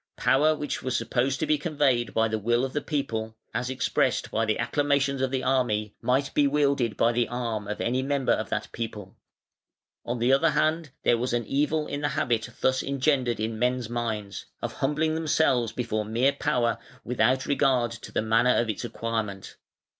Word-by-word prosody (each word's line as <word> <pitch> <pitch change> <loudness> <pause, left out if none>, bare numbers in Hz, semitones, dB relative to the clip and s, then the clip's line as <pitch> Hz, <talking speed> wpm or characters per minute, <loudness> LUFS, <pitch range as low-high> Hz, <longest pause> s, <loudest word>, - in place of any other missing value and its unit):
Power 155 +3 +3
which 145 -1 -4
was 130 -1 -1
supposed 130 +2 0
to - - +2
be 155 -1 +2
conveyed 140 -8 +1
by 115 0 +2
the 110 0 -2
will 120 +4 +1
of 130 - -6
the 145 - -1
people 110 -7 -3 0.2
(as 125 +1 -2
expressed 130 0 0
by 115 +1 +1
the 110 0 0
acclamations 140 -2 +1
of 130 - +1
the 130 0 -2
army) 115 -5 +1
might 135 +2 +1
be 145 -1 +4
wielded 140 -5 +1
by 115 - +3
the 120 0 +1
arm 115 -4 -3
of 105 - -4
any 125 +2 0
member 135 -1 0
of - - 0
that - - -2
people. 105 -4 -6 0.9
On 120 +1 -3
the 120 +3 +3
other 160 +5 +4
hand 155 +1 +1
there 120 - +3
was 125 0 -1
an 120 -1 0
evil 150 +5 0
in 145 0 -4
the 145 - +1
habit 120 -7 0
thus 130 0 +2
engendered 135 -4 0
in 110 0 -2
men's 125 -1 0
minds, 110 -4 -3
of - - -4
humbling 150 +3 0
themselves 155 -7 +2
before 115 -3 -2
mere 120 +6 +1
power 120 -4 0 0.2
without 125 +2 +1
regard 130 -4 +2
to 115 - -9
the - - 0
manner 115 +3 +3
of 115 -2 +1
its 105 - -6
acquirement. 110 -4 -4
125 Hz, 190 wpm, -26 LUFS, 115-140 Hz, 0.9 s, be